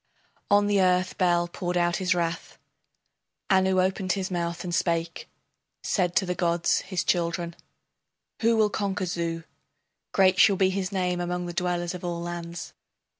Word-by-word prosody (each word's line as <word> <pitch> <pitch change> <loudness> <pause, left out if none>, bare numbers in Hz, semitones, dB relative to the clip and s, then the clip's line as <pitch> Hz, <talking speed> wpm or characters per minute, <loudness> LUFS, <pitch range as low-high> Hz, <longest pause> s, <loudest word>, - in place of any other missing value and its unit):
On 205 0 +5
the 205 -1 +2
earth 185 0 +2
Bel 175 -2 +3
poured 175 +1 -3
out 175 0 +2
his 185 -1 +1
wrath. 170 -1 -3 0.9
Anu 190 0 +3
opened 185 0 +1
his 190 -1 -3
mouth 170 -1 -2
and 175 -1 -4
spake, 170 -1 -1 0.5
Said 180 -3 0
to 180 - +3
the 180 - -1
gods 170 -1 +1
his 185 -2 -3
children: 170 -1 -1 0.9
Who 230 0 +3
will 215 -1 +3
conquer 200 -2 -2
Zu? 170 -1 -3 0.7
Great 185 -1 +4
shall 200 - +6
be 190 0 +2
his 190 0 -2
name 180 -2 -1
among 180 0 -2
the 175 - -5
dwellers 175 0 -1
of 180 - -8
all 175 -1 -3
lands. 170 0 -6
180 Hz, 160 wpm, -26 LUFS, 170-190 Hz, 0.9 s, shall